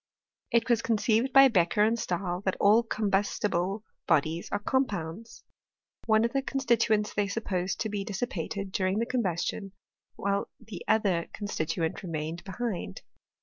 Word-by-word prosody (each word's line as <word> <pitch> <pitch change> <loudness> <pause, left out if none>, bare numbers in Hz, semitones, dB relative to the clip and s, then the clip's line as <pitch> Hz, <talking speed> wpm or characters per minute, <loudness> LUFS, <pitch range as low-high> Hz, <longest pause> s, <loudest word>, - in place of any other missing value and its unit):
It 235 -1 +2
was 235 -2 +3
conceived 230 +3 +1
by 270 0 +8
Beccher 210 -1 +3
and 230 +1 0
Stahl 180 -1 -2
that 190 - 0
all 210 +3 +6
combustible 205 -2 0 0.2
bodies 160 +1 +1
are - - +1
compounds. 215 -2 -2 0.6
One 220 0 +4
of 235 - -2
the 275 - +2
con 270 0 -3
stituents 225 -4 +2
they 205 -1 +1
supposed 190 -3 -2
to 220 - -1
be 205 -1 -2
dissipated 200 -2 -4
during 185 +1 0
the 230 - +1
combustion, 195 -4 -2 0.4
while 200 0 -1
the 215 -6 -9
other 195 -6 +2
constituent 165 -5 -2
remained 165 -1 -4
be 195 - -8
hind. 210 - -4
205 Hz, 145 wpm, -28 LUFS, 180-230 Hz, 0.6 s, by